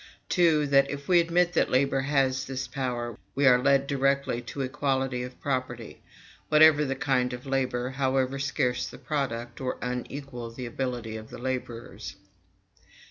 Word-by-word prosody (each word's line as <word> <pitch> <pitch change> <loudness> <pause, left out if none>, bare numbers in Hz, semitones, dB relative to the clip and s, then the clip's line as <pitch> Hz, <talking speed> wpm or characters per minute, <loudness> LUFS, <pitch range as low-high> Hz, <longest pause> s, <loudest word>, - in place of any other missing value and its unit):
2. 165 -5 +4
That, 140 -1 +4
if 140 0 -6
we 180 -2 +6
admit 175 +1 +2
that - - +2
labor 135 +1 +2
has 135 -1 +1
this 135 0 -4
power, 120 -3 -3 0.2
we 140 - +2
are 125 -2 +6
led 135 +1 +3
directly 140 -3 0
to 130 +3 -6
equality 130 -1 -1
of 125 0 -8
property, 130 -4 -3 0.5
whatever 155 -1 +7
the 135 -2 -1
kind 130 -3 0
of 125 +2 -7
labor, 130 -2 -1
however 135 0 0
scarce 125 -2 0
the - - -10
product, 120 -5 -3
or 130 -1 -2
unequal 125 0 -5
the 125 +2 -7
ability 120 -2 -4
of 110 0 -10
the - - -9
laborers. 120 -5 -5
130 Hz, 155 wpm, -27 LUFS, 125-140 Hz, 0.5 s, whatever